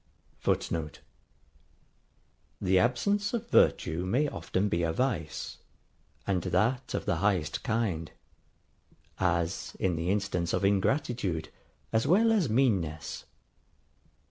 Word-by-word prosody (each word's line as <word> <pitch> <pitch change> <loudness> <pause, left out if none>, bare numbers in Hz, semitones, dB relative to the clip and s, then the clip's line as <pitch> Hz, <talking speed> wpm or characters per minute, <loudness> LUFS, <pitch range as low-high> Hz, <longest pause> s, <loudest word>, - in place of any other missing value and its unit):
[Footnote: 80 -3 -1 1.6
The 95 0 +3
absence 200 - +1
of 230 0 -5
virtue 80 +3 +3
may 125 +11 +1
often 100 -7 -1
be 85 -4 0
a 85 -1 +1
vice; 110 - -2 0.7
and 95 -3 0
that 105 +9 0
of - - -3
the - - +1
highest 90 -4 0
kind; 105 -8 -1 1.1
as 85 -2 -1
in 90 -3 +1
the 85 +2 -2
instance 95 -4 0
of - - +1
ingratitude, 100 - 0 0.4
as 115 +4 +2
well 220 +8 +5
as 200 - +2
meanness. 95 - 0
100 Hz, 110 wpm, -29 LUFS, 85-125 Hz, 1.6 s, well